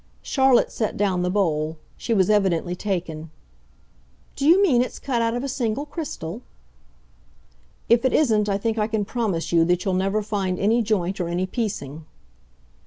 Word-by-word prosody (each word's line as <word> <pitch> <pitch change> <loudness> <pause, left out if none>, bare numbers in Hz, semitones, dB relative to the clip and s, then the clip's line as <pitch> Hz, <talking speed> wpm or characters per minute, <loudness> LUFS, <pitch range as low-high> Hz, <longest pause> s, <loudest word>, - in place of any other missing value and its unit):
Charlotte 265 -3 +3
set 220 - -2
down 190 -3 +1
the 180 - 0
bowl; 160 -5 0 0.2
she - - -6
was 190 -5 +3
evidently 185 -4 +1
taken. 170 -5 -4 1.1
"Do 280 - -1
you 345 +4 +7
mean 300 -12 +4
it's 250 - -3
cut 250 -4 -1
out 230 0 0
of 245 - -3
a - - -2
single 250 0 -2
crystal?" 245 - -6 1.5
"If 235 +1 +4
it 260 - +2
isn't 215 -8 +2
I 195 - +1
think 225 +2 -2
I 210 - +1
can 220 -2 -1
promise 205 -8 -2
you 165 -1 +4
that 175 +1 0
you'll 190 - 0
never 195 +3 0
find 195 -3 -2
any 220 +5 +2
joint 195 -3 -1
or 175 - -2
any 175 +2 -1
piecing." 165 - -4
205 Hz, 175 wpm, -23 LUFS, 180-235 Hz, 1.5 s, you